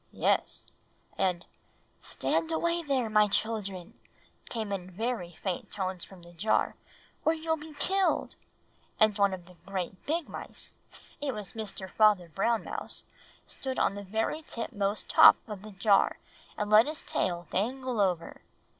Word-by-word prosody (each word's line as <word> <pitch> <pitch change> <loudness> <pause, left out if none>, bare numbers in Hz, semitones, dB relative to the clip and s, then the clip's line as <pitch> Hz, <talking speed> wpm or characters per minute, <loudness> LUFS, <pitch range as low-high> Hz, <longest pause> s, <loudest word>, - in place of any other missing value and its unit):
"Yes; - - 0 0.5
and 180 -2 0 0.5
'Stand 325 - 0
away 340 +1 +1
there, 275 -6 0
my 210 -1 +5
children,' 200 -4 -2 0.5
came 220 -3 -3
in 185 -2 -3
very 190 -2 -3
faint 185 -3 -2
tones 185 -3 -3
from 185 -3 -13
the 175 0 -13
jar, 205 +6 +1 0.5
'or 320 - +3
you'll 320 0 0
be 310 -1 -11
killed;' 380 +5 +1 0.6
and 215 -1 +5
one 200 -1 +4
of 185 -2 -6
the 180 0 -17
great 190 -1 -4
big 325 +2 0
mice - - -7 0.5
it 275 -4 -1
was 210 -3 -7
Mr. 210 -3 -4
Father 205 -3 +4
Brown 220 +7 +1
Mouse - - -6 0.4
stood 265 -1 -5
on - - +2
the 200 - -6
very 220 +10 -1
tip 240 -6 -4
most 200 0 -1
top - - +9
of 210 -3 -6
the 215 +1 -10
jar, 200 +1 +3 0.4
and 210 0 -2
let 215 +4 +8
his 305 +1 -4
tail 175 -1 -1
dangle 250 +4 -1
over. 180 -4 -1
210 Hz, 155 wpm, -30 LUFS, 190-250 Hz, 0.6 s, top